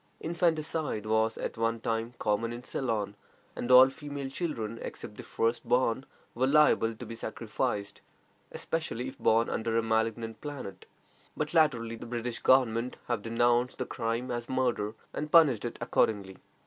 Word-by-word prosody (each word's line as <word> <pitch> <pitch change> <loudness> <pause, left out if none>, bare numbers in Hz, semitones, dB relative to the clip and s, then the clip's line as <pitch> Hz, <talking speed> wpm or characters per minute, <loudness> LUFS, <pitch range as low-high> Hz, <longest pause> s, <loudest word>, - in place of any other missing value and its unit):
Infanticide 160 - -1
was 110 +1 +1
at - - -4
one 115 0 +1
time 115 +2 -2
common 110 +2 0
in 120 +1 -7
Ceylon, 110 -7 -2 0.4
and 120 - -4
all 130 +1 +9
female 140 -1 -6
children, 115 -9 -3
except 105 - -7
the - - -8
first 115 +1 -1
born, 125 +1 +1 0.3
were 130 +2 +1
liable 135 -6 +4
to - - -8
be - - -7
sacrificed, 100 -2 -3 0.5
especially 130 -6 -3
if - - -14
born 115 +1 +3
under 115 0 -1
a 115 - +2
malignant 115 0 -1
planet; 145 -10 -7 0.5
but 150 +1 -2
latterly 125 -8 +2
the 120 - -9
British 120 0 -3
government 125 -2 +3
have 120 -3 -1
denounced 120 +2 +1
the - - -2
crime 115 +1 -2
as 120 -1 -4
murder, 120 -5 0 0.2
and 150 0 -4
punished 140 -10 +6
it 120 - -4
accordingly. 100 -3 0
120 Hz, 155 wpm, -30 LUFS, 115-130 Hz, 0.5 s, all